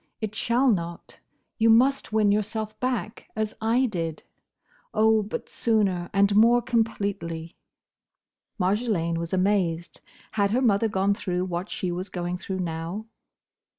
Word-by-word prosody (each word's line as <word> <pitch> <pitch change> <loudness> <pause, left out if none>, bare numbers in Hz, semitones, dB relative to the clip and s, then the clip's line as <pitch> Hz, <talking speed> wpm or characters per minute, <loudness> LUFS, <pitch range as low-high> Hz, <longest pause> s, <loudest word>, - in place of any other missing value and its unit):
It 215 -2 -3
shall 235 +4 +1
not. 170 -7 -2 0.4
You 225 +1 +4
must 255 +4 +4
win 215 -2 +3
yourself 215 +1 -1
back, 245 -3 -3
as 215 -1 -2
I 235 +4 +3
did. 165 -8 -3 0.7
Oh! 220 0 +4
but 210 +1 -5
sooner, 195 -6 0
and 200 0 +3
more 230 +3 +6
completely!" 200 -9 -2 1.0
Marjolaine 185 -4 0
was 170 0 -4
amazed. 185 -3 0 0.3
Had 200 -2 +1
her 240 +5 +1
mother 225 -1 +3
gone 200 -1 +1
through 180 -2 -2
what 180 +1 -4
she 180 -3 -2
was 180 +3 -4
going 175 0 -3
through 190 0 -4
now? 170 +5 -4
205 Hz, 135 wpm, -26 LUFS, 180-220 Hz, 1.0 s, more